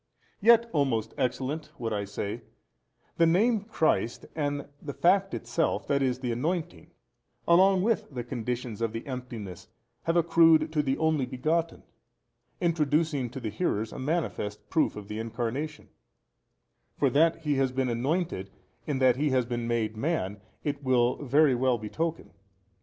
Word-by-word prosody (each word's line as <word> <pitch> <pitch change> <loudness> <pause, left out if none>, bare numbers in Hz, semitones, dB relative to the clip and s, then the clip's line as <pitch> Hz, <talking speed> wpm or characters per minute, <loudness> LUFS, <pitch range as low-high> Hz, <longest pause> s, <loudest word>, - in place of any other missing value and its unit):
Yet, 235 +2 +6
o 145 -3 +4
most 115 -5 -2
excellent 135 +4 -2
(would 115 -2 -3
I 100 -1 -2
say), 100 +3 -4 0.8
the 165 - +5
name 215 +7 +3
Christ 160 - 0
and 145 -2 -2
the 145 -2 -6
fact 195 +2 +3
itself, 165 - -1
that 140 -1 +2
is, 130 -1 0
the 125 -2 -1
Anointing, 145 - -3 0.6
along 185 +2 +5
with 230 +1 0
the 125 -3 -5
conditions 120 -2 -4
of 115 -1 -1
the 115 - -5
emptiness 120 -9 -7 0.4
have 165 +1 +2
accrued 165 -2 +5
to 150 - +3
the 135 -2 -1
Only 155 -5 +1
Begotten, 160 +6 -1 0.8
introducing 155 -5 +1
to 130 - -7
the 110 -4 -4
hearers 110 - -1
a - - -7
manifest 130 -8 -2
proof 160 -2 +2
of 105 -1 -8
the 105 +1 -5
Incarnation: 120 +7 -4 1.1
for - - +2
that 165 +3 +3
He 150 -3 +1
has 135 -1 +2
been 130 0 0
anointed 125 - -1 0.4
in 145 -3 0
that 130 -2 +4
He 150 +2 +1
has 130 -2 +2
been 120 -1 -3
made 110 -2 -1
man, 110 - -2 0.2
it 145 -2 -2
will 125 -1 +2
very 145 +1 +4
well 125 0 +2
betoken. 160 +10 -4
135 Hz, 155 wpm, -28 LUFS, 120-160 Hz, 1.1 s, Yet